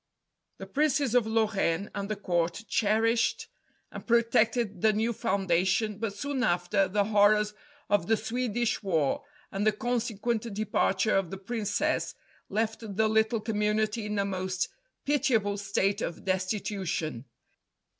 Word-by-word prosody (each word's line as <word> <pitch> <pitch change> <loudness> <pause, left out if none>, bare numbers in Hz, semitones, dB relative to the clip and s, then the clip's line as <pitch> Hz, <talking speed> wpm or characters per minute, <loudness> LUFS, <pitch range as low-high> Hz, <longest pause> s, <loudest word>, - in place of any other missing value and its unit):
The - - -7
Princes 285 -3 +1
of 245 -3 +3
Lorraine, 210 -5 0
and 200 0 -4
the 215 - -1
Court, 175 +1 -1
cherished 225 +3 +1 0.4
and - - -8
protected 230 -3 +2
the 220 -1 +4
new 225 +3 0
foundation, 195 0 0
but 215 -3 -3
soon 280 +2 -2
after, 180 +2 +2
the 205 +2 +1
horrors 210 0 +3 0.3
of 205 -4 +1
the 225 - +3
Swedish 240 +1 -1
war 175 - 0 0.3
and 195 +1 -2
the 215 - +4
consequent 230 0 -2
departure 215 0 +1
of 195 -3 +1
the 195 - -6
Princess, 220 +8 -1 0.3
left 220 +2 -1 0.2
the 220 +2 +3
little 220 +1 +2
Community 210 0 0
in 210 0 -3
a 200 - +1
most 185 -1 -2 0.4
pitiable 235 -9 +1
state 200 +1 0
of 170 - -5
destitution. 185 - -2
210 Hz, 135 wpm, -28 LUFS, 195-225 Hz, 0.4 s, the